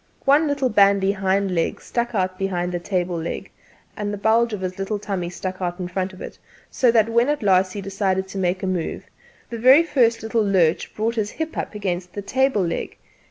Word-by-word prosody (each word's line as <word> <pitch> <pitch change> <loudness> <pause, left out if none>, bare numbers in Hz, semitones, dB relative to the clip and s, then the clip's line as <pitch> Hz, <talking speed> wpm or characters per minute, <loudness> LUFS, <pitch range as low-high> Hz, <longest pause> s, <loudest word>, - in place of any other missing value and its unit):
One 290 +3 +4
little 280 -3 0
bandy 200 -2 +4
hind 195 0 0
leg 165 -2 -1
stuck 240 -1 -3
out 185 -1 -1
behind 180 -2 -1
the 175 - -2
table¬ 175 -2 -2
leg, 170 - -5 0.4
and 205 -1 -3
the 205 - -4
bulge 225 +3 +2
of 210 -3 -4
his 185 0 -4
little 195 +2 -2
tummy 195 -4 -3
stuck 185 +1 -6
out 175 0 -3
in 180 - -3
front 185 +1 -3
of 185 - -13
it; - - -9 0.3
so 250 - +3
that 225 -2 +4
when 235 +3 +2
at 295 -5 -1
last 185 -1 +3
he 205 - -5
decided 190 -1 -1
to 195 - -5
make 185 +1 -1
a - - 0
move 185 -3 -3 0.5
the 230 - -4
very 260 +7 +7
first 240 -9 +2
little 225 0 +1
lurch 180 -5 +1
brought 225 +2 0
his 215 -3 -1
hip 320 +5 -5
up - - -4
against 180 -3 -3
the 205 - -5
table 260 -4 +1
leg. 170 - -4
195 Hz, 215 wpm, -22 LUFS, 185-230 Hz, 0.5 s, very